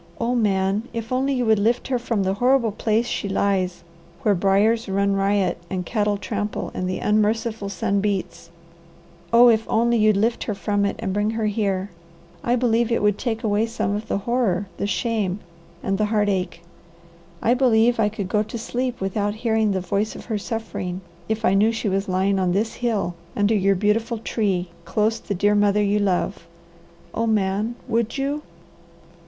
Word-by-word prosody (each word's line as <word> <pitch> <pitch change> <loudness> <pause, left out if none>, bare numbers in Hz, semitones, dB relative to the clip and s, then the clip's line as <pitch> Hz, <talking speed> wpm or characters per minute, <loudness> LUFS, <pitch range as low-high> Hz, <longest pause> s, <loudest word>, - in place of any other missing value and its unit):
Oh 235 +1 0
Man, 205 -1 +1
if 230 0 -5
only 265 +2 +1
you 250 -2 0
would 220 -2 +4
lift 235 +5 +1
her 255 -2 +1
from 230 -4 -1
the 190 0 +1
horrible 245 +1 +2
place 220 +3 0
she 205 - -3
lies, 190 -3 0 0.4
where 210 - +4
briers 200 +4 +2
run 200 +1 +1
riot 195 -2 +1
and 185 -1 -3
cattle 210 0 0
trample 205 +1 -3
and 185 0 -2
the 185 - -2
unmerciful 215 0 0
sun 200 +1 0
beats! 195 -4 -3 0.8
Oh 235 +1 +7
if 225 -1 +3
only 235 +1 +2
you'd 215 -2 +4
lift 230 +3 0
her 210 - -2
from 200 +2 0
it, 200 - -1
and 200 -4 -3
bring 205 +1 +1
her 220 - 0
here! 200 -2 -1 0.5
I 240 - +2
believe 235 -1 +1
it 230 - +1
would 210 -1 +2
take 230 -1 -2
away 215 +1 +1
some 215 -3 -2
of 215 +1 -5
the - - 0
horror, 205 -3 0
the 200 - -2
shame, 205 -3 -1 0.4
and 195 +1 -1
the 215 - +3
heartache. 205 -5 0 0.8
I 235 - +3
believe 240 -2 +3
I 210 -2 +3
could 205 -3 -5
go 210 +3 +1
to 215 +2 -5
sleep 245 +1 -3
without 205 +2 -1
hearing 220 -1 +2
the 190 -2 0
voice 200 +4 -1
of - - -9
her 220 -3 -2
suffering, 195 -4 -4 0.3
if 220 +1 -1
I - - +4
knew 210 +3 +4
she 225 -2 -2
was 195 +1 -1
lying 190 +1 +1
on 180 -1 +1
this 215 +4 0
hill, 220 -7 -1 0.2
under 205 +1 +2
your 195 -1 +3
beautiful 220 +4 0
tree, 195 -5 -1
close 215 +6 0
the 205 - -4
dear 205 +3 +2
mother 205 0 +3
you 205 +1 +2
love. 190 -2 -1 0.7
Oh 230 +1 -1
Man, 210 +2 0
would 230 +1 0
you 280 +2 -1
210 Hz, 185 wpm, -23 LUFS, 195-230 Hz, 0.8 s, Oh